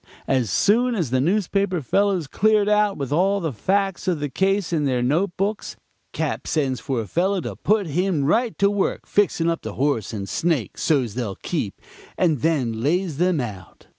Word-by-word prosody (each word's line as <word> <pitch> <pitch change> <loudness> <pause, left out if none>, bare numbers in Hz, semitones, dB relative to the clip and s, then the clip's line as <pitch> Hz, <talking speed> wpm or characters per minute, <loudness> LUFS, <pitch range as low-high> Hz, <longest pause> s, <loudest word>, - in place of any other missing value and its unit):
As 130 -5 +1
soon 235 - +2
as 165 - -2
the 130 0 +2
newspaper 195 +2 +1
fellows 190 - +1
cleared 210 +7 +2
out 210 -1 +2
with 140 -2 -4
all 190 +6 +2
the 160 -6 -3
facts 195 - -1
of 175 -4 +1
the 145 0 -2
case 195 +2 0
in 150 -3 +1
their 125 -3 0
note 170 +8 0
books, 200 +3 -2 0.4
Cap. - - -3
sends 135 -5 0
for 120 0 -2
a - - -6
fellow 190 - +1
and - - -7
puts 205 -6 +1
him 175 -2 0
right 230 - +1
to 200 +1 +3
work 205 -2 -1
fixing 190 -5 +1
up 165 0 0
the - - -6
horse 135 -7 0
and 100 -3 -5
snake 160 -6 -1
so's 130 -9 +1
they'll 110 -5 -3
keep, - - -4 0.4
and 160 -7 +2
then 125 -8 0
lays 165 +2 0
them 180 -2 +2
out. 100 -8 -7
170 Hz, 190 wpm, -22 LUFS, 135-195 Hz, 0.4 s, to